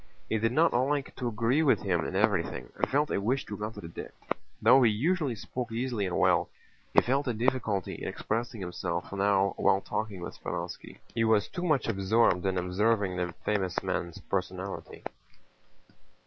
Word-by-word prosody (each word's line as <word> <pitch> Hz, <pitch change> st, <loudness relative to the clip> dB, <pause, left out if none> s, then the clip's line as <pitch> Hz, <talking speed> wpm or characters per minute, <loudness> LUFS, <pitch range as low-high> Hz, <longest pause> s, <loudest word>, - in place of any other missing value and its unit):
He 110 Hz, -, +1 dB
did 115 Hz, +2 st, +1 dB
not 165 Hz, +6 st, +4 dB
like 135 Hz, +3 st, 0 dB
to 125 Hz, -, -2 dB
agree 120 Hz, +6 st, +2 dB
with 150 Hz, -, +3 dB
him 90 Hz, -5 st, +1 dB
in -, -, -5 dB
everything 100 Hz, -4 st, 0 dB
and -, -, -1 dB
felt 145 Hz, +2 st, +1 dB
a -, -, 0 dB
wish 125 Hz, +6 st, 0 dB
to 105 Hz, -, -5 dB
contradict. 105 Hz, -5 st, -7 dB, 0.4 s
Though 125 Hz, +5 st, +6 dB
he 120 Hz, -, +6 dB
usually 140 Hz, -, +1 dB
spoke 120 Hz, +3 st, -5 dB
easily 115 Hz, -3 st, -1 dB
and 90 Hz, -, -2 dB
well, -, -, +3 dB, 0.4 s
he -, -, +6 dB
felt 135 Hz, +3 st, 0 dB
a 120 Hz, -, 0 dB
difficulty 115 Hz, -5 st, 0 dB
in -, -, -6 dB
expressing 115 Hz, -1 st, -3 dB
himself 90 Hz, 0 st, -3 dB
now 100 Hz, 0 st, +2 dB
while 95 Hz, -, +4 dB
talking 105 Hz, -4 st, -3 dB
with 85 Hz, -, -6 dB
Speránski. 85 Hz, +1 st, -5 dB, 0.2 s
He 115 Hz, -, +1 dB
was 110 Hz, -2 st, +3 dB
too 180 Hz, -, -6 dB
much 155 Hz, -7 st, +1 dB
absorbed 100 Hz, -2 st, +2 dB
in 95 Hz, -1 st, 0 dB
observing 95 Hz, +2 st, +1 dB
the 90 Hz, -1 st, -2 dB
famous 95 Hz, -4 st, 0 dB
man's 85 Hz, -1 st, -2 dB
personality. 95 Hz, 0 st, -4 dB
110 Hz, 170 wpm, -29 LUFS, 95-125 Hz, 0.4 s, Though